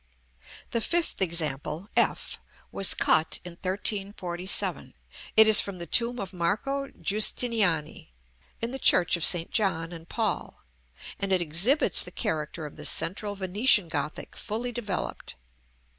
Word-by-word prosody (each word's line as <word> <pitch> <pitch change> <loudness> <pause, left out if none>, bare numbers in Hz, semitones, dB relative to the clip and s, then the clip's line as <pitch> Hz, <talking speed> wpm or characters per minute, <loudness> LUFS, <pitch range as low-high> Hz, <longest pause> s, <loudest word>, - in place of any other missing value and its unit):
The 230 - -1
fifth 340 - -1
example 165 0 -1
(f) - - +1 0.3
was 195 - +3
cut 160 0 +2
in 180 - -7
1347; 190 0 -1 0.4
it 220 0 +9
is 220 -1 +7
from 200 -2 -7
the 170 - -6
tomb 235 +8 +3
of 195 -1 -6
Marco 220 +11 -2
Giustiniani, 210 - 0 0.5
in 230 - -1
the 270 - -6
church 180 -8 +4
of 170 - -4
St. 170 -1 +3
John 180 -6 -1
and 165 -1 -11
Paul, - - -3 0.6
and 195 -1 -3
it 185 - +3
exhibits 175 - +1
the - - -8
character 160 - -4
of 150 - -11
the - - -5
central 205 +3 0
Venetian 200 0 +3
Gothic 150 -1 -5
fully 230 +3 -4
developed. 215 -6 -5
190 Hz, 135 wpm, -26 LUFS, 170-220 Hz, 0.6 s, it